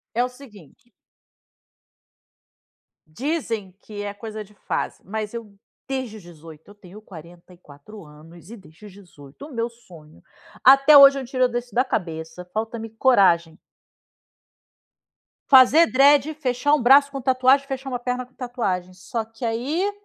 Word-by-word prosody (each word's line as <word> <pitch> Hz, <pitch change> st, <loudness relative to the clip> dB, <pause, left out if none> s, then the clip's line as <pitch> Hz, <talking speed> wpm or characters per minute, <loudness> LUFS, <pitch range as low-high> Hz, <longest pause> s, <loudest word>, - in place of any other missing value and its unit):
É 240 Hz, -, +2 dB
o 250 Hz, -, -3 dB
seguinte 240 Hz, -, -18 dB, 2.2 s
dizem 225 Hz, -, -4 dB
que 205 Hz, -1 st, -9 dB
é 205 Hz, -, -5 dB
coisa 215 Hz, +1 st, -8 dB
de 210 Hz, +1 st, -21 dB
fase. -, -, -5 dB
Mas 215 Hz, +2 st, -5 dB
eu 220 Hz, -4 st, -9 dB, 0.3 s
desde 260 Hz, -5 st, -5 dB
os 205 Hz, -, -15 dB
18 160 Hz, -1 st, -15 dB
eu 205 Hz, -, -16 dB
tenho 205 Hz, +1 st, -15 dB
44 175 Hz, 0 st, -15 dB
anos, 160 Hz, +4 st, -17 dB
e, 235 Hz, -, -10 dB
desde 190 Hz, 0 st, -18 dB
os 205 Hz, -, -12 dB
18, 175 Hz, -, -15 dB
o 295 Hz, -, -13 dB
meu 230 Hz, 0 st, -3 dB
sonho 175 Hz, -10 st, -18 dB, 0.4 s
até 275 Hz, +3 st, +7 dB
hoje 275 Hz, 0 st, +8 dB
eu -, -, -4 dB
não -, -, -8 dB
tiro 255 Hz, 0 st, 0 dB
disso 240 Hz, -1 st, -6 dB
da 250 Hz, +4 st, +1 dB
cabeça. 165 Hz, -6 st, -5 dB
Falta-me 225 Hz, +1 st, -5 dB
coragem. 190 Hz, -, +2 dB, 1.9 s
Fazer 280 Hz, +5 st, +6 dB
dread, 285 Hz, +2 st, +3 dB
fechar 290 Hz, 0 st, -1 dB
um 300 Hz, -, +2 dB
braço 275 Hz, +3 st, +5 dB
com 275 Hz, -1 st, -7 dB
tatuagem, 260 Hz, +2 st, +2 dB
fechar 270 Hz, 0 st, -7 dB
uma 250 Hz, -2 st, -4 dB
perna 250 Hz, +1 st, -4 dB
com 250 Hz, -, -30 dB
tatuagem. 200 Hz, -9 st, -4 dB
Só 225 Hz, +5 st, -5 dB
que, 225 Hz, +2 st, -9 dB
aí 280 Hz, -, -2 dB
225 Hz, 150 wpm, -22 LUFS, 185-260 Hz, 2.2 s, hoje